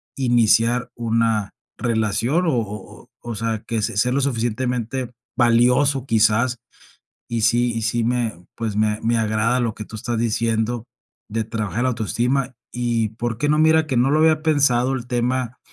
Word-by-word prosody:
iniciar 120 Hz, -1 st, +2 dB
una 115 Hz, -3 st, 0 dB, 0.2 s
relación 115 Hz, -, 0 dB
o 160 Hz, -6 st, +1 dB
o 105 Hz, -2 st, -8 dB, 0.2 s
o 115 Hz, -, -3 dB
sea, 110 Hz, 0 st, -2 dB
que 115 Hz, -2 st, -1 dB
sea 115 Hz, +3 st, 0 dB
lo 140 Hz, -, +1 dB
suficientemente 125 Hz, 0 st, -2 dB, 0.3 s
valioso 125 Hz, +3 st, +3 dB
quizás. 115 Hz, +1 st, +2 dB, 0.7 s
Y 115 Hz, -1 st, -1 dB
sí 120 Hz, +2 st, +3 dB
y 115 Hz, -, -3 dB
sí 115 Hz, +1 st, 0 dB
me, 115 Hz, -7 st, -2 dB
pues, 110 Hz, -3 st, -3 dB
me 105 Hz, 0 st, +1 dB
me 115 Hz, +1 st, +2 dB
agrada 110 Hz, +3 st, +1 dB
lo 115 Hz, -3 st, -1 dB
que 105 Hz, -, -7 dB
tú -, -, -10 dB
estás 115 Hz, +2 st, -3 dB
diciendo, 115 Hz, +1 st, -1 dB, 0.4 s
de 110 Hz, +1 st, -1 dB
trabajar 110 Hz, +1 st, -3 dB
la 130 Hz, -, +2 dB
autoestima 125 Hz, +3 st, -1 dB, 0.2 s
y 120 Hz, -2 st, -1 dB
por 115 Hz, +1 st, -4 dB
qué 145 Hz, +3 st, 0 dB
no, 150 Hz, -, +3 dB
mira 160 Hz, 0 st, +4 dB
que 130 Hz, -, -1 dB
no 125 Hz, +3 st, +3 dB
lo 155 Hz, -, +3 dB
había 155 Hz, 0 st, +4 dB
pensado 135 Hz, -5 st, +2 dB
el 125 Hz, -3 st, -4 dB
tema 125 Hz, 0 st, -1 dB
120 Hz, 165 wpm, -21 LUFS, 110-125 Hz, 0.7 s, mira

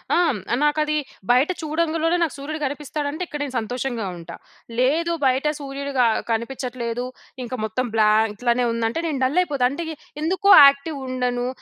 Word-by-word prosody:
ఆ! -, -, +3 dB, 0.5 s
నాకది 305 Hz, 0 st, +1 dB, 0.3 s
బయట 255 Hz, +7 st, +4 dB
చూడంగులోనే 325 Hz, +2 st, 0 dB
నాకు 320 Hz, -, -2 dB
సూర్యుడు 305 Hz, +3 st, -5 dB
కనిపిస్తాడంటే 295 Hz, +3 st, -4 dB
ఇక్కడ 295 Hz, -, -6 dB
నేను 265 Hz, -3 st, -6 dB
సంతోషంగా 240 Hz, -1 st, -3 dB
ఉంటా. 170 Hz, -, -9 dB, 0.4 s
లేదు 320 Hz, +7 st, +2 dB
బయట 265 Hz, +2 st, +2 dB
సూర్యుడు 280 Hz, 0 st, -5 dB
క -, -, +6 dB, 0.3 s
కనిపించట్లేదు. 245 Hz, 0 st, -3 dB, 0.4 s
ఇంకా 250 Hz, +1 st, -5 dB
మొత్తం 235 Hz, +4 st, -2 dB
బ్లాంక్ 215 Hz, 0 st, +3 dB
ఇట్లానే 245 Hz, +2 st, +1 dB
ఉందంటే 230 Hz, +6 st, -1 dB
నేను 290 Hz, -4 st, -2 dB
డల్లయిపోతా 290 Hz, -2 st, +1 dB
అంటే 335 Hz, +5 st, -4 dB, 0.4 s
ఎందుకో 375 Hz, +5 st, +1 dB, 0.2 s
యాక్టివ్ 280 Hz, +1 st, 0 dB
ఉండను. 250 Hz, -1 st, -1 dB
275 Hz, 140 wpm, -22 LUFS, 245-305 Hz, 0.5 s, క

